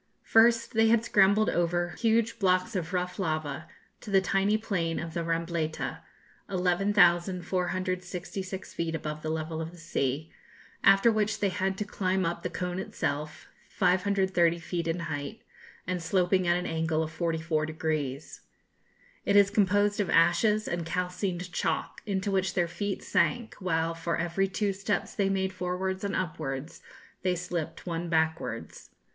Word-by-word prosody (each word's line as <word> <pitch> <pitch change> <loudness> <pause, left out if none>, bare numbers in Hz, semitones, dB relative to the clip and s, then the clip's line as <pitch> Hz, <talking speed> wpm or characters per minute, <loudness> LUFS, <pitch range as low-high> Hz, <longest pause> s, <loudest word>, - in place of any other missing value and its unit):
First 230 +1 +4
they 225 0 +4
had 230 0 +3
scrambled 205 +1 +4
over 175 0 +1
huge 230 +4 +1
blocks 185 +2 +2
of 175 -2 -2
rough 180 0 -2
lava 155 -5 -2 0.3
to 220 - -10
the 195 -1 +5
tiny 195 +2 +2
plain 175 -7 -1
of 165 -1 -5
the 170 - -2
Rambleta, 165 -1 -2 0.5
11,466 185 0 0
feet 165 -1 -2
above 155 -1 -4
the 155 - -3
level 160 0 -3
of 160 - -4
the 175 - -14
sea, 155 -2 -2 0.5
after 195 +4 +6
which 215 0 0
they 200 - +2
had 190 +1 -1
to 210 - -2
climb 190 -2 0
up 170 0 -2
the - - -3
cone 180 0 -3
itself, 150 -4 -3 0.2
530 185 -2 +2
feet 170 0 -3
in 165 +1 -1
height, 155 +5 -5 0.4
and 185 -1 -2
sloping 180 +2 +2
at 175 0 +4
an 180 - -3
angle 160 -1 0
of 160 - -5
44 160 -1 -1
degrees. 155 -3 -3 0.8
It 200 - +1
is 200 -1 +6
composed 205 0 +2
of 205 - 0
ashes 210 +6 +3
and 175 -1 -2
calcined 180 +1 -3
chalk, - - -2
into 200 0 -1
which 190 -1 0
their 175 -2 +2
feet 200 +3 -3
sank, 240 -2 +1
while, 165 -3 0
for 165 0 -2
every 175 +3 0
two 200 +1 -1
steps 195 0 -2
they 195 -2 +1
made 190 -1 0
forwards 185 +1 -2
and 200 - -1
upwards, 150 -5 -4 0.4
they 185 -1 +1
slipped 175 -2 -4
one 170 -1 -3
backwards. 160 -8 -1
180 Hz, 150 wpm, -28 LUFS, 165-195 Hz, 0.8 s, after